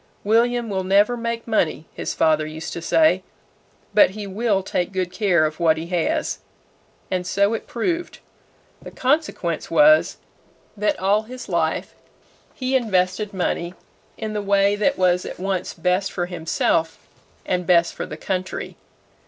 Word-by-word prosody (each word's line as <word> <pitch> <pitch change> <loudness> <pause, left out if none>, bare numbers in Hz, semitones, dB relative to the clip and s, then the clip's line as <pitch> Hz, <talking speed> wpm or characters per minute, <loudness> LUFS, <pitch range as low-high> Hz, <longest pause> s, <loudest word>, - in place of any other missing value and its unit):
"William 235 +2 +2
will 190 -3 -2
never 200 +6 +3
make 235 0 -4
money," 170 -8 0
his - - -4
father 155 -1 +3
used 155 +1 -6
to 170 - -5
say; 315 - +3 0.7
"but 210 - +6
he 205 +2 -7
will 200 0 0
take 180 -1 -2
good 185 -2 -2
care 185 -5 +2
of 155 +1 -4
what 160 -2 +3
he 160 - -4
has." 175 -1 -1 0.7
And 180 -1 -1
so 200 +3 +2
it 225 - -4
proved. 340 +8 -2 0.6
The - - -9
consequence 260 - -1
was, 305 +1 +5 0.6
that 210 0 0
all 200 +3 +2
his 250 +3 -9
life 170 -3 -1 0.6
he 260 0 -1
invested 200 -3 +1
money 175 -2 -2 0.4
in 220 -1 -4
the 210 - -2
way 200 0 +3
that 215 +7 +1
was 180 -1 +2
at - - -8
once 190 -1 -2
best 180 +3 0
for 175 - -2
himself 165 -1 -1 0.4
and 180 -2 -1
best 170 -1 +4
for - - -5
the - - -7
country. 185 -1 -4
195 Hz, 155 wpm, -22 LUFS, 175-220 Hz, 0.7 s, but